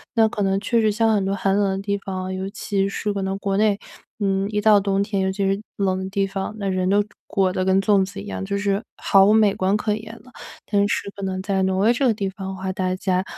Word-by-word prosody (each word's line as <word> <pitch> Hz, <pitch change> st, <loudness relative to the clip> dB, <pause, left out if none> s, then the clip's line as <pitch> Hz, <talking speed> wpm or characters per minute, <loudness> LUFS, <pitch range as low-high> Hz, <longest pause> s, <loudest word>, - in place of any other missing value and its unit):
那 225 Hz, -1 st, +5 dB
可 215 Hz, -, -4 dB
能 195 Hz, 0 st, +1 dB
确 230 Hz, +3 st, +1 dB
实 215 Hz, -1 st, +3 dB
像 225 Hz, +1 st, +2 dB
很 205 Hz, -2 st, +1 dB
多 195 Hz, +1 st, -1 dB
寒 195 Hz, 0 st, +1 dB
冷 200 Hz, -1 st, +2 dB
的 190 Hz, 0 st, -2 dB
地 200 Hz, 0 st, -1 dB
方 190 Hz, -1 st, -5 dB
哦， 185 Hz, -, -4 dB
尤 190 Hz, +1 st, -4 dB
其 195 Hz, -1 st, -1 dB
是 205 Hz, +1 st, -2 dB
可 200 Hz, -, -3 dB
能 190 Hz, 0 st, -2 dB
国 195 Hz, 0 st, -1 dB
内， 210 Hz, -1 st, +2 dB, 0.4 s
嗯， 195 Hz, -1 st, 0 dB
一 210 Hz, -1 st, -1 dB
到 210 Hz, -1 st, +5 dB
冬 195 Hz, 0 st, 0 dB
天， 200 Hz, -1 st, -1 dB
尤 190 Hz, 0 st, +1 dB
其 195 Hz, +1 st, -1 dB
是 195 Hz, +1 st, 0 dB, 0.2 s
冷 190 Hz, -2 st, 0 dB
的 190 Hz, 0 st, -4 dB
地 195 Hz, 0 st, 0 dB
方， 195 Hz, +2 st, -4 dB
那 200 Hz, -2 st, -3 dB
人 185 Hz, -1 st, 0 dB
都 205 Hz, +1 st, +3 dB, 0.2 s
裹 190 Hz, -2 st, +1 dB
得 185 Hz, -, -1 dB
跟 190 Hz, 0 st, +3 dB
粽 200 Hz, -1 st, +3 dB
子 195 Hz, +1 st, -9 dB
一 -, -, -9 dB
样， 200 Hz, -, -4 dB
就 200 Hz, +1 st, -2 dB
是 200 Hz, 0 st, 0 dB, 0.2 s
毫 195 Hz, -1 st, +5 dB
无 210 Hz, -, +5 dB
美 215 Hz, -2 st, +4 dB
观 190 Hz, +1 st, +1 dB
可 210 Hz, 0 st, -1 dB
言 220 Hz, +1 st, -7 dB
了。 255 Hz, -, -17 dB, 0.3 s
但 205 Hz, -1 st, +2 dB
是 200 Hz, -, -2 dB
可 200 Hz, -, -9 dB
能 190 Hz, -1 st, -2 dB
在 195 Hz, 0 st, -1 dB
挪 190 Hz, 0 st, +1 dB
威 215 Hz, +4 st, +4 dB
这 260 Hz, +2 st, +1 dB
个 235 Hz, -, +3 dB
地 200 Hz, -2 st, -2 dB
方 190 Hz, 0 st, -7 dB
的 190 Hz, -, -5 dB
话， 190 Hz, 0 st, -4 dB
大 185 Hz, 0 st, -1 dB
家 185 Hz, -1 st, 0 dB
195 Hz, 300 characters per minute, -22 LUFS, 190-205 Hz, 0.4 s, 那